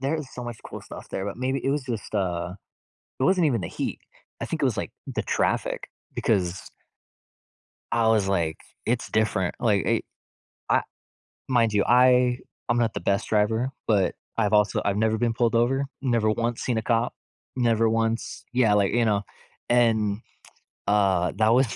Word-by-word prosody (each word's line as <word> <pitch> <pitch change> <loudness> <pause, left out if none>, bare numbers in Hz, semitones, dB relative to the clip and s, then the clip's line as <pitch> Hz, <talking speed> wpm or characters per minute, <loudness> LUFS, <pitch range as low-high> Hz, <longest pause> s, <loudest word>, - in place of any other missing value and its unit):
there 140 +4 0
is 150 -4 -7
so 125 - -6
much 120 -2 -6
cool - - -7
stuff - - -10
there, 95 - -3
but 100 - -4
maybe, 130 +2 -1
it 135 - +2
was 145 0 0
just, 115 -4 -5
uh 90 -2 -1 0.7
it 130 - +1
wasn't 180 -1 +4
even 120 -5 +1
the - - -3
heat. - - -4 0.4
I - - -1
think - - -3
it - - +3
was, - - 0
like, - - -3 0.2
the - - -3
traffic - - -1 0.2
because 95 -5 0 1.2
I 115 -1 +3
was 105 -3 +3
like 85 -5 0 0.3
it's 120 +1 0
different. 105 -4 +1
Like, 105 -4 +2
eh - - +2 0.7
I - - +4 0.7
mind 115 -4 +3
you, 105 - +3
I 125 0 +5 0.3
I'm 120 - +2
not 115 -2 +2
the - - -3
best 100 0 0
driver, 110 +4 +1 0.2
but 100 -4 +2 0.2
I've 105 -2 +1
also 105 0 +3
I've 100 0 +1
never 110 +1 +2
been 120 -1 +1
pulled 115 0 +1
over. 135 +4 +2 0.2
Never 115 -4 +2
once 115 +2 -1
seen 120 -3 0
a - - -2
cop. 115 +1 +1 0.4
Never 115 -2 +3
once 115 0 -1
Yeah, 115 -5 +4
like, 100 -2 +2
you 120 -1 +3
know, 105 -2 +2 0.5
and, 110 -4 +3 0.7
uh, 95 -4 +3
that 110 0 +4
was 130 0 +4
115 Hz, 180 wpm, -25 LUFS, 105-120 Hz, 1.2 s, I